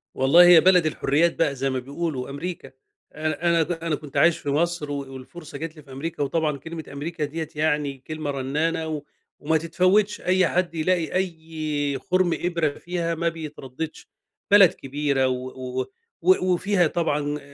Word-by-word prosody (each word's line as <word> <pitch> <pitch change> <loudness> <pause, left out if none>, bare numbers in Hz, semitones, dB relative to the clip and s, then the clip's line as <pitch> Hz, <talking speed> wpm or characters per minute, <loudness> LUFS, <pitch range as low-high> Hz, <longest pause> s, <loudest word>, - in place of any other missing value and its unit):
والله 150 +7 +6
هي 175 -2 +9
بلد 180 -3 +5
الحرّيات 155 +2 +1
بقى 145 -4 +1
زي 135 +1 -1
ما 130 -1 -1
بيقولوا، 140 0 -4
أمريكا، 145 0 -6 0.4
أنا 155 0 -2
أنا 170 -1 +4
ده 165 +1 -4
أنا 165 -2 0
كنت 150 -1 -8
عايش 170 -1 +5
في 145 - -5
مصر 155 0 0
و - - -2 0.2
والفرصة 150 +5 -10
جات 160 0 -6
لي 155 - -12
في 140 - -16
أمريكا، 145 +3 -4
وطبعًا 150 +1 0
كلمة 160 +3 -7
أمريكا 155 +2 -3
دِيّة 155 +1 -5
يعني 150 -2 0
كلمة 155 -2 -3
رنانة 150 +4 -1
و 155 -2 -3 0.4
وما 160 +2 +1
تتفوتش، 185 +6 +2
أي 185 0 +3
حد 175 -1 -1
يلاقي 165 0 0
أي 160 -5 -2
خُرم 185 -2 +1
إبرة 170 -3 +1
فيها 170 -1 -2
ما 170 +1 0
بيترددش، 155 -2 -7 0.4
بلد 200 -4 +8
كبيرة 140 -1 -1
و 130 0 -2
و 130 0 -6 0.4
و 375 - +5
و 185 0 +2
وفيها 180 -1 +2
طبعًا 150 -3 -1
160 Hz, 170 wpm, -24 LUFS, 145-170 Hz, 0.4 s, هي